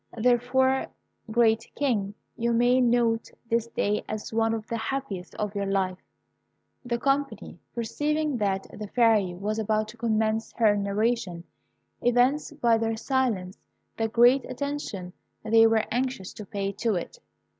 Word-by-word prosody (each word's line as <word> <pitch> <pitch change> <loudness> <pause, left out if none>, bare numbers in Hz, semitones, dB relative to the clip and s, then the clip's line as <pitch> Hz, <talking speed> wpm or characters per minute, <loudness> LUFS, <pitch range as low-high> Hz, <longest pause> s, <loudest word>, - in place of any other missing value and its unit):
Therefore, 250 +3 +2 0.4
great 225 0 +2
King, 210 -8 0 0.2
you 235 0 0
may 245 +2 +4
note 235 -2 +2 0.2
this 230 0 +1
day 210 -2 -1
as 215 +1 -5
one 225 0 +2
of 220 -1 -6
the 230 - -4
happiest 225 -6 -4
of 210 -1 -3
your 200 -1 -2
life." 190 -2 0 0.8
The 240 -1 -1
company, 275 +3 -1 0.2
perceiving 295 +5 -1
that 195 -3 0
the 210 -1 -6
Fairy 215 -6 +3
was 210 +4 -2
about 215 0 0
to 235 - -12
commence 220 -1 0
her 215 -3 +3
narration, 200 -3 -1 0.6
evinced 255 +5 +2
by 230 -1 +4
their 225 0 -1
silence 225 -8 -1 0.4
the 225 - 0
great 240 +4 +5
attention 255 -10 -4 0.3
they 225 +1 +6
were 225 -1 +2
anxious 245 -5 -2
to 210 - -9
pay 200 -1 -2
to 225 -3 +1
it. 335 - -5
225 Hz, 145 wpm, -26 LUFS, 210-245 Hz, 0.8 s, they